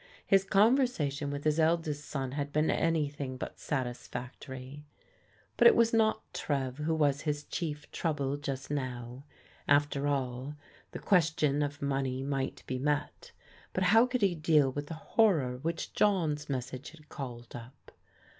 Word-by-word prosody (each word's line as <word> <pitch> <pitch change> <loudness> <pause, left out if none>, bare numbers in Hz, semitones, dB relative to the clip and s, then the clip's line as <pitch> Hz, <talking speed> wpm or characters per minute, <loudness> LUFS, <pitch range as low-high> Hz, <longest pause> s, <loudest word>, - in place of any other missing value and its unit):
His 195 -2 +4
conver 225 +7 +4
sation 145 - -3
with 145 0 -4
his 155 +1 +2
eldest 160 -2 +1
soon 135 -3 -3
had 145 +1 -3
been 155 +2 +2
anything 145 -5 -1
but - - -7
satis 125 -4 -3
factory. 130 +3 -8 0.7
But - - +8
it 465 - +7
was 230 0 +3
not 220 -1 +3
Trev 135 -2 -2
who 160 +2 0
was 145 -2 +2
his 150 -1 -2
chief 150 -3 -5
trouble 145 -4 -1
just 140 -1 -5
now. 125 -1 -4 0.4
After 145 0 +3
all, 135 0 -2 0.4
the - - -6
question 160 -5 +2
of 145 0 -3
money 135 -2 -1
might 135 -1 -3
be 130 - -3
met, 145 +2 -2 0.4
but 185 - 0
how 225 +6 +6
could 250 -3 -1
he 195 -3 +4
deal 155 -4 +3
with 145 +2 -5
the 165 - -5
horror 155 - +2
which 165 +5 -4
John's 160 -8 +1
message 130 0 -4
had 155 -1 -17
called 120 -5 -8
up 120 +3 -12
145 Hz, 155 wpm, -31 LUFS, 135-160 Hz, 0.7 s, But